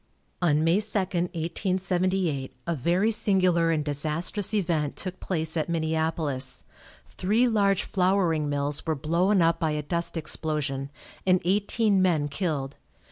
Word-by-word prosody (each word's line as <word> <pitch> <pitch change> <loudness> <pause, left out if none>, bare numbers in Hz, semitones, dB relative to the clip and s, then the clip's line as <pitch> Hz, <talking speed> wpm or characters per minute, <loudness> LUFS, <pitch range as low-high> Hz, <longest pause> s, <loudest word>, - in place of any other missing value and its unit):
On 155 -3 +3
May 165 +4 +3
2, 215 0 +1
1878, 180 -3 -1
a 170 - -1
very 175 - +1
singular 185 -6 +3
and 155 -2 0
disastrous 155 +7 -1
event 170 -8 0
took 185 0 -4
place 160 -2 -2
at 160 +1 -1
Minneapolis. 160 -4 -1 0.4
Three 220 +7 +1
large 200 -4 +2
flouring 180 -5 +1
mills 145 0 -2
were 160 - +1
blown 170 +6 +2
up 165 0 +2
by 160 -3 +1
a 150 0 -2
dust 170 +2 -1
explosion, 150 -3 -2 0.4
and 185 0 +5
eighteen 205 +1 +2
men 160 -6 +2
killed. 145 -4 -3
170 Hz, 135 wpm, -26 LUFS, 155-190 Hz, 0.4 s, and